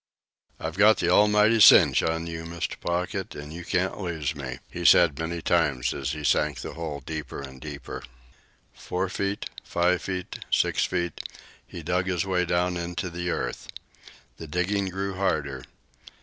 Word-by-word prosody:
"I've 80 +4 -5
got 110 +1 +7
the 85 - 0
almighty 105 +3 +5
cinch - - +8
on 80 0 -1
you, 80 -1 -5
Mr. 85 0 -4
Pocket, 90 +2 -3
an' 75 +1 -8
you 85 +2 -7
can't 95 +3 -1
lose 80 -5 -2
me," 65 -4 -6
he 90 - -7
said 85 -3 +6
many 80 0 -3
times 70 -8 +1
as 70 +1 -3
he 75 -1 -6
sank - - +1
the - - -6
hole 80 -4 -5
deeper 75 -4 -5
and 65 -2 -9
deeper. 70 -1 -7 0.7
Four - - -3
feet, 100 0 -3
five 90 +1 +1
feet, 90 -2 -5
six - - +2
feet, 85 -3 -2 0.5
he 85 - -9
dug 90 +3 0
his 90 -2 0
way 90 -2 +1
down 90 +1 0
into 90 +1 -4
the 90 +1 -3
earth. - - -3 0.7
The 80 - -8
digging 95 +5 0
grew 95 +1 -3
harder. 75 -8 -1
85 Hz, 165 wpm, -26 LUFS, 80-90 Hz, 0.7 s, cinch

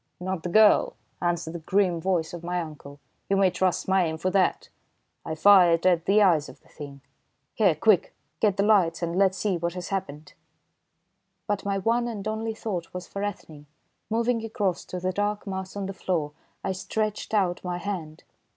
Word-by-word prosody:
"Not 185 -1 -3
the 175 - -4
girl," 220 - +5 0.3
answered 170 -2 -1
the 170 - -5
grim 180 0 +1
voice 175 -3 -1
of 175 -1 -7
my 180 +1 -2
uncle, 150 -3 -8 0.3
"you 195 - +2
may 195 -2 +4
trust 185 0 0
my 190 -1 +3
aim 160 -1 -3
for 185 +3 -1
that! 185 -2 +1 0.6
I 160 - -4
fired 175 -2 +5
at 175 -3 +3
the 205 +2 +4
eyes 165 -7 +3
of - - -14
the - - -25
Thing. 140 -2 -10 0.5
Here, 195 -7 +3
quick, 190 +4 +3 0.3
get 205 -2 +1
lights 195 -5 +3
and 170 0 -2
let's 190 0 +3
see 190 -1 0
what 170 0 -2
has 180 -1 -6
happened." 170 -6 -5 1.1
But 205 -2 -2
my 200 -1 0
one 230 +5 +1
and 215 -3 -5
only 220 +1 -3
thought 185 -7 -5
was 180 -1 -6
for 200 - -6
Ethne. 160 -7 -6 0.4
Moving 230 +1 0
across 205 -5 -2
to 180 - -6
the 185 +1 -1
dark 205 +2 -2
mass 190 -1 -5
on 200 -1 -3
the 195 - -5
floor, 165 -6 -2 0.3
I 195 - -1
stretched 215 +3 -3
out 185 -4 +1
my 180 -1 -3
hand. 175 -5 -6
185 Hz, 190 wpm, -26 LUFS, 170-205 Hz, 1.1 s, girl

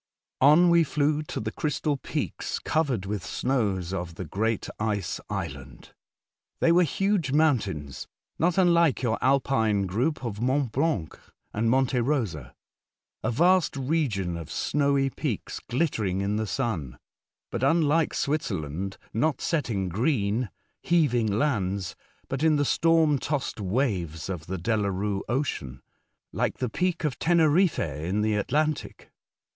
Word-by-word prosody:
On 155 +6 +6
we 170 -1 +6
flew 150 0 +1
to 150 - -5
the 110 0 -3
crystal 150 +1 -1
peaks 135 - -3
covered 135 -11 0
with 100 -1 -3
snows 100 -9 -1
of 90 -3 -4
the 90 - -5
great 110 +7 -1
Ice 105 -4 -1
Island. - - -6 0.7
They 165 - +4
were 175 +2 +5
huge 180 -2 +1
mountains, 105 - 0 0.3
not 175 +2 +2
unlike 170 -7 +4
your 115 -2 0
Alpine 125 -7 +2
group 125 - -1
of 105 -2 -4
Mont 130 0 +1
Blanc 140 - -1 0.3
and 115 +2 +1
Monte 130 0 +2
Rosa. 110 - -2 0.7
A 110 - -1
vast 175 +5 +3
region 125 - -1
of 85 -3 -8
snowy 140 -1 +1
peaks - - -4
glittering 110 - 0
in 100 +1 0
the 110 0 -1
Sun, 85 - -2 0.5
but 120 - -3
unlike 155 +2 +2
Switzer 155 - -1
land, 80 +7 -5 0.2
not 130 +4 +1
set 155 -7 -1
in 95 -4 -1
green, 110 - 0 0.3
heaving 140 -10 +2
lands, 100 -7 -1 0.3
but 135 0 -3
in 160 -1 +4
the 145 0 +2
storm 160 -2 +3
toss'd 140 -5 -2
waves 95 - -1
of 85 -5 -5
the 95 +1 -3
Delarue 100 0 -1
Ocean 95 - -2 0.5
—like - - -1
the 125 - -2
peak 180 +6 -1
of 145 -4 -2
Teneriffe 170 +1 +3
in 80 +7 -2
the 110 0 +1
Atlantic. 150 +9 -1
125 Hz, 140 wpm, -26 LUFS, 100-150 Hz, 0.7 s, On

